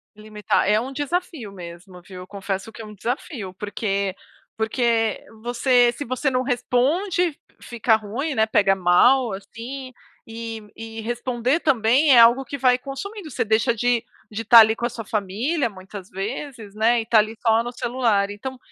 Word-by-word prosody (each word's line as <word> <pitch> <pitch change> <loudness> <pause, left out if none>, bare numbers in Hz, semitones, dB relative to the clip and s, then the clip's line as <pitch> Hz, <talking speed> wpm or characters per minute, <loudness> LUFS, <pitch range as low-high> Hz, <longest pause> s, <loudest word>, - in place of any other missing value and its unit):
Limitar, 210 -2 -1
é 210 +1 +4
um 255 +4 -5
desafio 290 - -4
mesmo, 180 0 -11
viu? 180 0 -11
Confesso 195 +1 -5
que 230 - -9
é - - -8
um 210 - -11
desafio, 225 - -5
porque 200 -2 -2 0.4
porque 225 -1 0 0.2
você 245 0 +3
se 290 - -6
você 255 +2 -1
não 255 -1 0
responde, 295 +7 0 0.2
fica 230 -1 +1
ruim, 235 +8 -4
né, 220 0 +3
pega 200 -3 +3
mal 220 +8 +4
assim, 245 +7 -8 0.3
e 225 -1 -7
e 225 0 -8
responder 240 +5 -1
também 270 +1 +3
é 240 - +8
algo 235 +3 +6
que 275 +2 -6
vai 250 -1 +3
consumindo, 310 - -8
você 240 - -1
deixa 220 +3 +2
de 240 +1 0 0.3
de 220 +1 -5
tá 230 +1 +8
ali 220 0 +6
com 235 - -3
a - - 0
sua 225 -2 -8
família 225 - -1
muitas 190 0 -11
vezes, 215 +2 -6
né, 230 +2 +3
e 225 - -8
tá 225 -1 +4
ali 215 +1 -1
só 225 0 +4
no 240 - -5
celular 235 -5 0
então, 260 +6 -7
230 Hz, 170 wpm, -22 LUFS, 210-255 Hz, 0.4 s, é